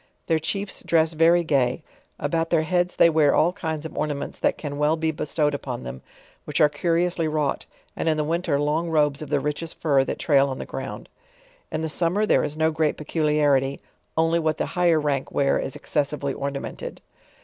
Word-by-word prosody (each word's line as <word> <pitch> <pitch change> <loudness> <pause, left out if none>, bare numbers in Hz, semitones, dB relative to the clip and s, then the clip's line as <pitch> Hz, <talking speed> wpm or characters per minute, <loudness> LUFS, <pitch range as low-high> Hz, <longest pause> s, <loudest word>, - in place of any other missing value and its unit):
Their 160 -2 +2
chiefs 195 +5 -3
dress 165 -1 +2
very 165 +2 +4
g;\v; 135 -2 +1 0.3
about 165 +3 -1
their 165 -2 +2
heads 180 +2 0
thpy 170 - +6
wear 155 -2 +4
all 175 +3 +3
kinds 160 -5 -4
of 160 - -7
ornaments 145 -2 -3
that - - +1
fan 145 -2 -5
well 150 +2 +2
be 160 0 0
bestowed 150 -1 -1
upon 130 -3 -5
them, 65 +1 -7 0.4
which - - -2
are 150 - +6
curiously 170 +2 0
wrought, 150 -2 -1 0.3
and - - -1
in 155 - +1
the 150 - +1
winter 165 -1 0
lung 150 +4 0
robes 150 -3 +2
of 155 - -7
the 145 -1 +2
richest 150 +3 -4
fur 140 -4 +3
that - - -3
tsail 140 -3 +3
on 130 - -4
the - - -6
ground. - - -6 0.6
In 155 - -2
the 160 - -1
summer 175 +6 +1
there - - +3
is 150 - -3
no 160 0 +2
great 155 -1 0
peculiarity, 150 -3 +1 0.4
only 165 +1 +3
what 155 -1 0
the - - -1
higher 175 -3 +3
rank 145 -3 -1
wear 140 -1 +2
is 135 - -4
excessively 145 -2 -2
ornamented. 140 0 -5
155 Hz, 195 wpm, -24 LUFS, 145-165 Hz, 0.6 s, thpy